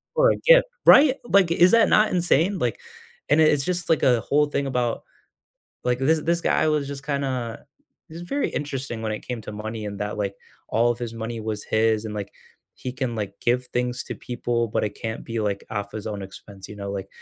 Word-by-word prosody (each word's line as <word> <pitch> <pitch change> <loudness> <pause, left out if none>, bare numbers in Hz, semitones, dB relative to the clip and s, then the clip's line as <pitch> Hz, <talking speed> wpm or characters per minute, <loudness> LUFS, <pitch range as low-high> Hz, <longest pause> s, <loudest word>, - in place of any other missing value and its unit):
For - - +5
a - - -1
gift - - +7 0.2
right, 275 -2 +8
like, 195 -7 +3
is 175 +2 +5
that 230 -1 +5
not 215 0 +4
insane? 175 +2 +2
Like, 120 -3 -1 0.5
and 150 +2 +4
it's 150 -3 +4
just, 175 +2 -2
like, 160 - +2
a 125 -3 +4
whole 150 +5 +2
thing 140 -1 -2
about 125 -3 -1 0.8
like, 125 0 +1
this 155 +4 +2
this 170 +1 +1
guy 155 - +2
was 150 -2 +1
just 140 -1 -7
kinda 130 -5 -3 0.4
he's 165 +2 -8
very 280 +11 -1
interesting 135 -5 -4
when 110 -1 -2
it 105 - -5
came 125 -2 -4
to 105 - -8
money 110 +1 -6
and 100 -1 -6
that, 105 0 -3
like, 100 -1 -2 0.3
all 120 +2 +3
of 120 - -6
his 120 -2 -5
money 115 0 -5
was 110 -1 -4
his 110 0 +1
and, 105 - -5
like, 100 -1 -6 0.4
he 125 - -5
can, 125 -2 -3
like, 100 -2 -4
give 125 +1 +1
things 125 0 -2
to - - -6
people 120 -1 -2
but 110 - -1
it 105 - -4
can't 110 0 -4
be, 115 0 -3
like, 100 -2 -2
off 100 -1 -4
his 110 - -6
own 105 -2 -4
expense, 95 0 -11
you 105 - -10
know, 100 -1 -5
like, 95 -1 -5
120 Hz, 220 wpm, -24 LUFS, 110-150 Hz, 0.8 s, right